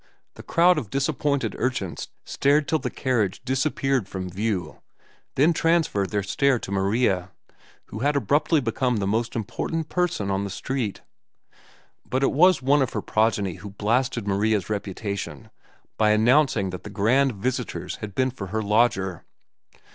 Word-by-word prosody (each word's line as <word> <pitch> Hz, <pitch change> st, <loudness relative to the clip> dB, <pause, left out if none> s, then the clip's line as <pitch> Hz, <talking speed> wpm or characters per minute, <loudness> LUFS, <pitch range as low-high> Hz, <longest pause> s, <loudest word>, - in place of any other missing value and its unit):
The -, -, -11 dB
crowd 175 Hz, 0 st, +3 dB
of 115 Hz, -9 st, -8 dB
disappointed 140 Hz, +1 st, 0 dB
urchins 100 Hz, -9 st, -2 dB, 0.2 s
stared 145 Hz, +2 st, +2 dB
till 160 Hz, -, +1 dB
the 130 Hz, -, -3 dB
carriage 115 Hz, -10 st, -1 dB
disappeared 135 Hz, -4 st, 0 dB
from 95 Hz, -1 st, -5 dB
view, 100 Hz, -1 st, -3 dB, 0.5 s
then 155 Hz, +6 st, +4 dB
transferred 160 Hz, -, +1 dB
their 105 Hz, -1 st, -1 dB
stare 135 Hz, +7 st, +2 dB
to 100 Hz, -, -7 dB
Maria, 95 Hz, -1 st, +1 dB, 0.6 s
who 110 Hz, -, -6 dB
had 145 Hz, +4 st, +1 dB
abruptly 145 Hz, +2 st, +2 dB
become 125 Hz, 0 st, 0 dB
the 100 Hz, -, -1 dB
most 115 Hz, +4 st, -1 dB
important 155 Hz, +8 st, -3 dB
person 170 Hz, -, 0 dB
on 95 Hz, +1 st, 0 dB
the 100 Hz, -, -4 dB
street. 115 Hz, +1 st, -3 dB, 1.0 s
But 130 Hz, +2 st, -1 dB
it -, -, +3 dB
was 175 Hz, 0 st, +4 dB
one 140 Hz, +2 st, +4 dB
of 130 Hz, -, -1 dB
her -, -, -2 dB
progeny 105 Hz, -4 st, 0 dB
who 100 Hz, +3 st, -9 dB
blasted 115 Hz, +2 st, -1 dB
Maria's 105 Hz, +1 st, +1 dB
reputation 100 Hz, -6 st, -4 dB, 0.5 s
by 110 Hz, -1 st, +4 dB
announcing 110 Hz, -2 st, +3 dB
that 90 Hz, -, -6 dB
the -, -, -8 dB
grand 120 Hz, +7 st, +2 dB
visitors 115 Hz, +5 st, -3 dB
had 105 Hz, -2 st, -8 dB
been 130 Hz, 0 st, +1 dB
for 100 Hz, -6 st, -7 dB
her 110 Hz, +3 st, -2 dB
lodger. 100 Hz, -4 st, +1 dB
115 Hz, 155 wpm, -24 LUFS, 100-135 Hz, 1.0 s, then